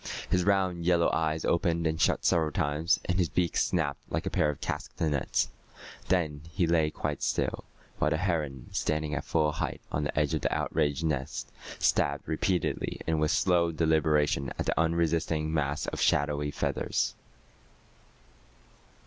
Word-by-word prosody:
His 90 -1 +3
round 95 -3 +1
yellow 85 -1 +3
eyes 80 0 0
opened 85 -1 +1
and 80 0 0
shut - - +2
several 80 -2 +3
times, 75 +5 +1
and 90 +1 0
his 85 -4 +2
beak 90 -2 0
snapped 75 -5 +1
like - - -2
a - - -2
pair 75 - +2
of 75 - -4
castanets. 70 -6 -1 0.6
Then 80 -6 0
he 85 +3 +1
lay 80 -2 +3
quite 75 -1 -4
still, - - -1 0.3
while 75 - +3
the 80 - +1
heron, 75 -8 -2
standing 75 -1 -1
at 70 - -2
full 75 -2 +1
height - - -3
on 75 - -1
the 75 - -1
edge 75 -1 +1
of - - 0
the - - 0
outraged 75 -1 0
nest, 70 -5 -2 0.3
stabbed 70 0 +1
repeatedly 90 +3 -1
and 80 -1 +1
with 75 0 +2
slow 85 -1 +3
deliberation 80 -3 +2
at - - -2
the - - 0
unresisting 80 -1 +1
mass 75 -2 0
of - - -4
shadowy 75 0 +2
feathers. - - -1
80 Hz, 155 wpm, -29 LUFS, 75-85 Hz, 0.6 s, His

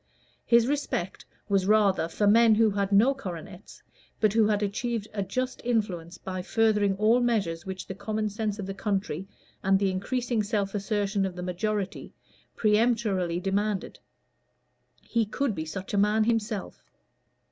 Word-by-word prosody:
His 235 -1 +5
respect 265 -10 -2 0.2
was 195 -2 +1
rather 200 -6 +3
for 205 +5 -1
men 225 +2 +6
who 220 0 +4
had 200 0 -1
no 220 +7 +5
coronets, 180 - -9 0.4
but 215 -2 +3
who 220 -1 +4
achieved 210 +2 -1
a 205 - -2
just 255 +7 -3
influence 190 -8 -1
by 185 -1 -5
furthering 210 -1 +2
all 220 +4 +4
measures 195 -9 0
which 190 -1 -5
the - - -6
common 215 +2 -2
sense 210 0 -3
of 200 - -5
the 195 - -4
country, 195 -3 -2 0.3
and 195 0 +3
the 195 -1 +1
increasing 240 +4 -1
self 205 -2 -1
assertion 205 -1 -1
of 190 -2 -3
the 180 - -5
majority, 195 +2 -3 0.4
peremptorily 210 -5 +1
demanded. 200 +1 -2 1.0
He 230 -1 0
could 230 +3 -1
be 160 -4 -4
such 185 +5 -6
a 200 - +2
man 210 +2 +3
himself. 220 -3 -2
205 Hz, 150 wpm, -27 LUFS, 190-220 Hz, 1.0 s, men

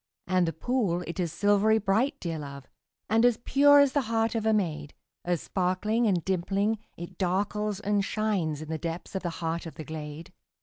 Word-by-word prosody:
And 185 -1 +2
the 165 - -1
pool, 195 -4 0
it 170 - -6
is 170 -3 -1
silvery 205 +4 +3
bright, 220 +8 +1
dear 165 -3 -4
love, 140 -2 -8 0.4
And 225 +1 +3
as 245 -2 +4
pure 285 +4 +5
as 285 -2 +5
the 285 - +2
heart 225 -1 +1
of 220 -1 -1
a - - +4
maid, 155 -8 -1 0.3
As 175 -2 -1
sparkling 205 +5 0
and 180 -5 +1
dimpling, 195 +4 0 0.2
it 170 0 -9
darkles 205 +2 -1
and 205 -1 +1
shines 190 -8 -1
In 155 - -11
the 160 -1 -3
depths 165 +1 -5
of 190 - -2
the 175 - -2 0.2
heart 165 +1 -2
of 160 - -10
the 155 - -7
glade. 155 +2 -8
190 Hz, 200 wpm, -28 LUFS, 170-220 Hz, 0.4 s, pure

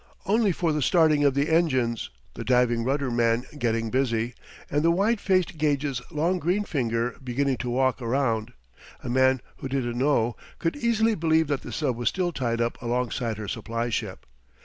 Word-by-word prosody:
Only 210 0 +3
for 165 -2 0
the 150 - -1
starting 155 +1 +4
of 140 -2 +3
the 140 +2 +1
engines, 130 -8 +1 0.2
the - - -6
diving 125 -2 +2
rudder 135 +1 0
man 120 +1 +1
getting 115 -1 0
busy, 120 -2 0 0.3
and 145 - 0
the 165 - +3
wide 200 +6 +2
faced 185 -3 +1
gauge's 140 -3 0
long 170 +5 0
green 180 +6 +1
finger 120 - -1
beginning 130 +1 0
to 125 - -4
walk 130 +1 +1
around, 120 -2 0 0.5
a - - -5
man 130 0 +3 0.2
who - - -5
didn't 120 -3 -2
know 120 -5 +2 0.2
could 165 - -1
easily 230 -4 +2
believe 160 -3 +2
that 140 -2 0
the - - -8
sub 140 -6 -1
was 120 - +1
still 180 -2 -1
tied 120 -6 -2
up 115 0 -2
alongside 120 -2 -1
her 105 -1 -6
supply 115 +3 -3
ship. - - -4
130 Hz, 180 wpm, -26 LUFS, 120-160 Hz, 0.5 s, starting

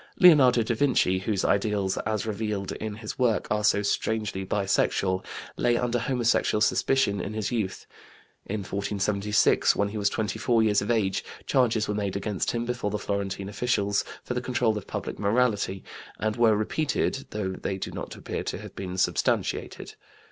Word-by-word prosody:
Leonardo 135 -9 +7
da 115 - 0
Vinci, 115 -7 +2
whose 100 0 -1
ideals 100 -1 +1
as 110 0 -1
revealed 105 -2 -3
in 110 -1 -5
his 110 +2 -7
work 120 -4 +2
are 105 0 +1
so 105 0 +3
strangely 105 -1 -1
bisexual, 95 -1 0 0.3
lay 120 -1 +2
under 120 0 0
homosexual 120 -3 +1
suspicion 110 -1 +2
in 110 - -5
his 110 +1 -2
youth. 110 -6 -2 0.6
In 105 +1 -2
1476, 100 +1 +1
when 100 0 +1
he 105 +1 -4
was 100 -1 +2
24 110 +2 +1
years 105 -2 +3
of 100 - -4
age, 105 -5 +1 0.2
charges 115 -4 +2
were 105 - -1
made 100 -2 -2
against 100 -1 -2
him 120 0 -1
before 125 -3 -2
the 105 - -2
Florentine 100 -1 -3
officials 100 -1 0 0.2
for - - -3
the 125 - -2
control 125 -3 +1
of 105 - -6
public - - -5
morality, 105 -3 +1 0.3
and 110 0 -1
were 115 -3 +4
repeated, 135 +4 -1
though 105 -3 -3
they 95 +1 -3
do - - -5
not - - -6
appear - - -5
to - - -3
have - - -10
been 95 -1 -5
substantiated. 95 - -1
105 Hz, 170 wpm, -26 LUFS, 100-115 Hz, 0.6 s, Leonardo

